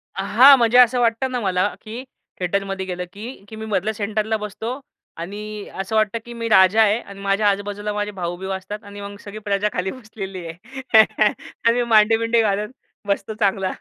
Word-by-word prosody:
अ, -, -, -2 dB
हां, 275 Hz, +2 st, +7 dB
म्हणजे 235 Hz, 0 st, +3 dB
असं 250 Hz, 0 st, +6 dB
वाटतं 240 Hz, +2 st, +1 dB
ना 250 Hz, -, -1 dB
मला, 185 Hz, -1 st, +1 dB
की 230 Hz, +3 st, -7 dB, 0.4 s
थिएटरमध्ये 195 Hz, +1 st, -2 dB
गेलं, 180 Hz, -1 st, -4 dB
की, 220 Hz, +2 st, -9 dB
की 220 Hz, -, -9 dB
मी 220 Hz, 0 st, -7 dB
मधल्या 215 Hz, 0 st, -1 dB
सेंटरला 215 Hz, +1 st, -1 dB
बसतो 220 Hz, +5 st, -5 dB, 0.4 s
आणि 210 Hz, +4 st, -6 dB
असं 195 Hz, +3 st, -3 dB
वाटतं, 215 Hz, +1 st, +1 dB
की 240 Hz, -, -9 dB
मी 230 Hz, -1 st, -4 dB
राजा 190 Hz, +1 st, +6 dB
आहे 215 Hz, +1 st, +3 dB
आणि 200 Hz, -4 st, -12 dB
माझ्या 200 Hz, +1 st, +2 dB
आजू-बाजूला 205 Hz, +1 st, -3 dB
माझे 210 Hz, 0 st, -2 dB
भाऊबिऊ 180 Hz, 0 st, -5 dB
असतात 205 Hz, +3 st, -8 dB
आणि 205 Hz, 0 st, -10 dB
मग 200 Hz, 0 st, -8 dB
सगळी 205 Hz, +1 st, -8 dB
प्रजा 200 Hz, 0 st, +1 dB
खाली 190 Hz, 0 st, -2 dB
बसलेली 195 Hz, -7 st, -8 dB
आहे 220 Hz, +7 st, +2 dB, 0.6 s
आणि 230 Hz, -, +6 dB
मी 245 Hz, 0 st, +1 dB
मांडीबिंडी 225 Hz, +1 st, +4 dB
घालत 210 Hz, -1 st, 0 dB, 0.4 s
बसतो 200 Hz, +2 st, -1 dB
चांगला. 195 Hz, -3 st, 0 dB
210 Hz, 185 wpm, -21 LUFS, 195-225 Hz, 0.6 s, हां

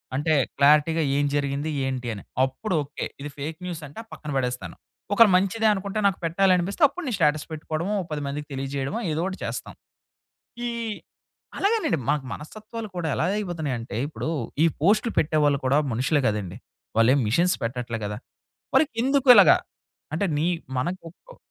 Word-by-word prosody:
అంటే 155 Hz, +3 st, +1 dB, 0.2 s
క్లారిటీగా 150 Hz, +3 st, +4 dB
ఏం 145 Hz, -, +2 dB
జరిగింది? 140 Hz, +1 st, -1 dB, 0.2 s
ఏంటి 130 Hz, -2 st, -3 dB
అని, 100 Hz, -, -9 dB, 0.2 s
అప్పుడు 135 Hz, +10 st, -2 dB
ఓకే. 145 Hz, +1 st, -5 dB, 0.2 s
ఇది 145 Hz, -, -5 dB
ఫేక్ 155 Hz, +3 st, -5 dB
న్యూసంటే 155 Hz, -5 st, -7 dB
ఆ -, -, -26 dB
పక్కన 150 Hz, -1 st, -7 dB
బడేస్తాను. 125 Hz, -2 st, -2 dB, 0.4 s
ఒకళ్ళ 225 Hz, +1 st, +7 dB
మంచిదే 200 Hz, +4 st, +2 dB
అనుకుంటే 200 Hz, +1 st, -3 dB
నాకు 195 Hz, -, 0 dB
పెట్టాలనిపిస్తే, 185 Hz, -, +2 dB
అప్పుడు 335 Hz, +6 st, -8 dB
నేను 250 Hz, -6 st, -1 dB
స్టేటస్ 150 Hz, -3 st, +2 dB
పెట్టుకోవడమో. 160 Hz, +5 st, -3 dB
ఒక -, -, -7 dB
10 150 Hz, -1 st, -2 dB
మందికి 145 Hz, +1 st, -4 dB
తెలియజేయడవో, 135 Hz, +6 st, -3 dB
ఏదోకటి 180 Hz, +5 st, -2 dB
చేస్తాం. -, -, -5 dB, 0.9 s
ఇ -, -, -1 dB, 0.9 s
అలాగేనండి. 400 Hz, -, +1 dB
మనకు 150 Hz, -2 st, +1 dB
మనస్తత్వాలు 215 Hz, +7 st, -8 dB
కూడా, 175 Hz, -2 st, -2 dB
ఎలా -, -, 0 dB
అయిపోతున్నాయంటే 150 Hz, -, -3 dB
ఇప్పుడు, 155 Hz, +1 st, -4 dB, 0.3 s
ఈ -, -, +6 dB, 0.2 s
పోస్ట్‌లు 215 Hz, +6 st, +3 dB
పెట్టేవాళ్ళు 150 Hz, -2 st, +2 dB
కూడా 135 Hz, +3 st, +3 dB
మనుషులే 135 Hz, +6 st, +1 dB
గదండి. 105 Hz, -3 st, -2 dB, 0.4 s
వాళ్ళేం 125 Hz, +5 st, +5 dB
మిషెన్స్ 170 Hz, -, +2 dB
పెట్టట్లే 120 Hz, -1 st, -3 dB
గదా! 105 Hz, 0 st, -4 dB, 0.6 s
మరి -, -, +6 dB, 0.2 s
ఇందుకిలాగా. 265 Hz, -2 st, +7 dB, 0.6 s
అంటే 170 Hz, +6 st, 0 dB
నీ 160 Hz, -, +1 dB, 0.3 s
మనకు 175 Hz, +7 st, -3 dB, 0.3 s
ఓ -, -, -13 dB
155 Hz, 150 wpm, -25 LUFS, 140-190 Hz, 0.9 s, ఒకళ్ళ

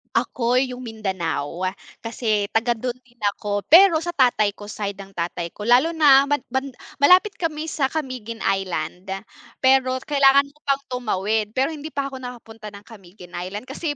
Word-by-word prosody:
Ako 245 Hz, +1 st, +1 dB
yung 255 Hz, -1 st, -3 dB
Mindanao. 185 Hz, -, -3 dB, 0.4 s
Kasi 225 Hz, -2 st, -1 dB
taga 235 Hz, +2 st, +1 dB
dun 240 Hz, +2 st, -4 dB
din 250 Hz, -1 st, -28 dB, 0.2 s
ako, 205 Hz, 0 st, -3 dB
pero 360 Hz, +1 st, +8 dB
sa 345 Hz, -, -2 dB
tatay 245 Hz, -8 st, +3 dB
ko, 205 Hz, 0 st, -12 dB
side 200 Hz, -1 st, -5 dB
ng 195 Hz, 0 st, -11 dB
tatay 170 Hz, 0 st, -3 dB
ko. 210 Hz, -, -7 dB
Lalo 255 Hz, +9 st, +4 dB
na 280 Hz, -3 st, +6 dB
ban 290 Hz, -3 st, 0 dB
ban 265 Hz, +2 st, -1 dB, 0.3 s
malapit 365 Hz, +8 st, +6 dB
kami 315 Hz, -3 st, -2 dB
sa 275 Hz, -3 st, +1 dB
Camiguin 255 Hz, -7 st, -5 dB
Island. 185 Hz, -2 st, -2 dB, 0.6 s
Pero 260 Hz, -1 st, +4 dB
kailangan 280 Hz, -1 st, +4 dB
mo 300 Hz, -, -29 dB
pang 275 Hz, 0 st, +1 dB
tumawid, 215 Hz, -3 st, -1 dB
pero 265 Hz, +4 st, +1 dB
hindi 305 Hz, -1 st, -7 dB
pa 275 Hz, -1 st, -2 dB
ako 265 Hz, -, -7 dB
nakapunta 225 Hz, -3 st, -9 dB
ng 200 Hz, -, -12 dB
Camiguin 185 Hz, -5 st, -14 dB
Island 190 Hz, +5 st, -6 dB
kasi 290 Hz, +4 st, -4 dB
245 Hz, 170 wpm, -22 LUFS, 205-275 Hz, 0.6 s, pero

